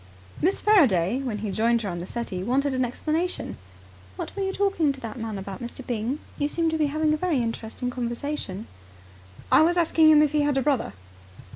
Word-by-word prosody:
Miss 370 +5 +1
Faraday, 255 - +4
when 245 -6 -3
he 205 - -2
joined 230 +3 +2
her 200 - -2
on 175 -1 -4
the 175 - -6
settee, 225 -6 -4
wanted 265 +7 +1
an 255 0 +1
explanation. 310 +8 -2 0.6
"What - - -6
were 400 - -3
you 385 0 0
talking 385 -7 +1
to 275 - -7
that 230 -1 -7
man 220 -2 -4
about, 195 0 -7
Mr. 240 +2 -7
Byng? 240 +3 -2 0.2
You 290 - +1
seemed 330 +2 0
to 320 - 0
be 300 - +3
having 305 +1 +1
a - - +1
very 345 -2 0
interesting 230 +1 -3
conversation." 240 -4 -4 0.9
"I - - +7
was 345 +3 +3
asking 325 -2 +5
him 305 -1 +7
if 300 - +1
he 300 -1 +2
had 290 -1 +1
a 270 - +2
brother." 275 - 0
270 Hz, 210 wpm, -25 LUFS, 230-310 Hz, 0.9 s, I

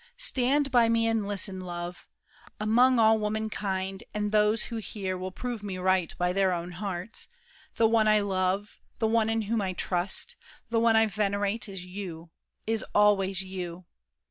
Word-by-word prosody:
Stand 280 - +3
by 240 -2 +5
me 230 0 +2
and 225 -3 0
listen, 195 -1 +1
love: 175 -1 -6 0.5
Among 240 +4 +4
all 220 -1 +5
womankind—and 210 -1 -3
those 210 +1 +3
who 230 - -4
hear 200 -3 -4
Will 185 +1 -4
prove 240 +3 -5
me 200 -3 -5
right 185 -2 +1
by 180 0 0
their 190 -1 +2
own 175 0 -3
hearts—the 195 +4 -4
one 220 -1 +3
I 215 0 +5
love, 195 0 -1 0.2
the 225 - +1
one 225 0 +2
in 225 0 0
whom 220 +1 -1
I 190 -2 -2
trust, 180 +1 -2 0.3
the 230 - +2
one 230 -1 +4
I 220 0 +5
venerate 205 0 -1
is 190 -2 -7
you—is 180 +4 -6
always 195 -2 +3
you! 180 -2 -6
205 Hz, 155 wpm, -28 LUFS, 185-225 Hz, 0.5 s, by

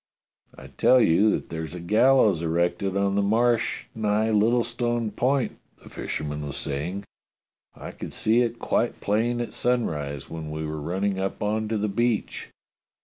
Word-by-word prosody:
" - - -29
I - - -11
tell 130 - +4
you 105 0 +4
that - - -1
there's 80 +1 -5
a - - -6
gallows 105 0 +4
erected 85 +3 0
on 100 0 +1
the 100 - +2
Marsh 115 +3 +1
nigh 110 0 +1
Littlestone 120 +1 +1
Point," 130 +1 0 0.2
the - - -13
fisherman 75 -1 -4
was 70 - -5
saying. 85 +8 -3 0.7
"I - - -8
could - - -8
see 115 +3 +2
it 120 -1 -1
quite 120 - -1
plain 115 +4 0
at 120 - -4
sunrise 75 - -1
when 80 -2 -6
we 80 +1 -4
were 75 0 -4
running 95 +5 -1
up 95 +2 -3
on 110 +1 0
to 110 0 -1
the 105 +1 0
beach." 115 +2 -1
105 Hz, 165 wpm, -25 LUFS, 85-115 Hz, 0.7 s, tell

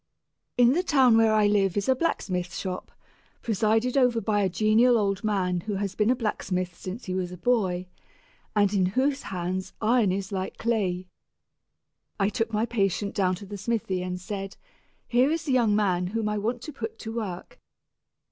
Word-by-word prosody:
In 245 +1 +6
the 350 - +2
town 265 -9 +4
where 225 -1 +5
I 215 -1 +4
live 200 -2 +2
is 200 - 0
a 260 - +5
blacksmith 180 - -2
shop, 185 -1 -5 0.5
presided 225 +3 +1
over 250 -4 +3
by 210 -1 0
a 195 - +2
genial 220 +6 +4
old 200 -2 0
man 185 -4 0
who 205 +4 -4
has 200 -1 -2
been 210 +2 +1
a 255 - +4
blacksmith 185 -6 -2
since 190 +7 -7
he 185 - -3
was 185 -1 -2
a 180 - -8
boy, 185 -4 +1 0.7
and 205 -1 +3
in 190 -2 +3
whose 270 +8 0
hands 185 +1 -4
iron 225 -2 +3
is 195 +1 -3
like 190 -1 -4
clay. 195 -6 -1 1.1
I 195 0 +3
took 225 +2 -2
my 215 +1 +1
patient 200 -3 -1
down 185 -2 +1
to 200 - -10
the 200 0 -7
smithy 200 -3 -1
and 180 0 -4
said, 195 +1 -6 0.5
"Here 250 +3 +3
is 325 +1 -2
a - - +1
young 235 -5 +3
man 180 -4 +1
whom 220 +2 -2
I 210 0 -1
want 235 +4 -2
to 305 - -7
put 225 -4 -6
to 225 -1 -7
work. 215 - -5
210 Hz, 185 wpm, -26 LUFS, 185-235 Hz, 1.1 s, In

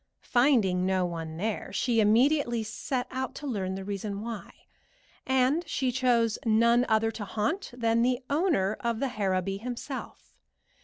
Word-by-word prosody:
Finding 235 -9 +3
no 185 -1 +1
one 165 -2 -5
there, 210 +4 -3
she 240 -3 +1
immediately 240 +2 +3
set 245 +3 -3
out 260 0 -3
to 295 - -7
learn 195 -8 -2
the 195 - -5
reason 200 0 -4
why, 225 0 -6 0.8
and 265 +5 +2
she 260 -2 0
chose 240 -3 +2
none 235 +2 +4
other 220 0 +2
to 220 - -6
haunt 225 - -2
than 230 -1 +1
the 250 0 +2
owner 285 - +1
of 235 -1 -1
the 275 - 0
Harrowby 195 -4 -1
himself. 250 +4 -7
230 Hz, 150 wpm, -28 LUFS, 205-255 Hz, 0.8 s, none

